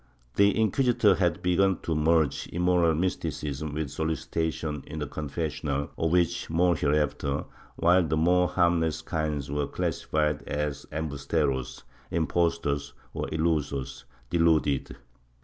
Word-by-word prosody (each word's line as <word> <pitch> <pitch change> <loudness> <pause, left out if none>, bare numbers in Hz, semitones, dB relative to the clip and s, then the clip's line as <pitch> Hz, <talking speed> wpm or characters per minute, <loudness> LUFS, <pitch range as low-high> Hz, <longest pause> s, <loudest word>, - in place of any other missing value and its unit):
The 100 +2 +4
inquisitors 110 -3 +3
had 85 -2 +1
begim 95 +1 +2
to 80 - -1
merge 80 -1 +2
immoral 90 -2 +2
mysti 90 +4 -1
cism 75 +1 -5
with 75 -3 -3
solicitation 80 -2 -2
in 80 - -7
the 75 - -2
confessional, 75 0 -3
of 80 - 0
which 85 0 +1
more 85 +2 +3
hereafter, 75 -1 0 0.3
while 90 +2 +4
the 80 +1 0
more 90 +3 +3
harmless 85 -3 +1
kinds 75 -3 -2
were 75 -1 -1
classified 75 -1 -1
as 75 -1 -3
emhusieros 70 -4 -2 0.3
(impos 85 +1 +1
tors) 70 0 -2 0.2
or - - -3
ilusos 75 -6 -1 0.3
(deluded). 80 -5 +2
80 Hz, 125 wpm, -27 LUFS, 75-85 Hz, 0.3 s, The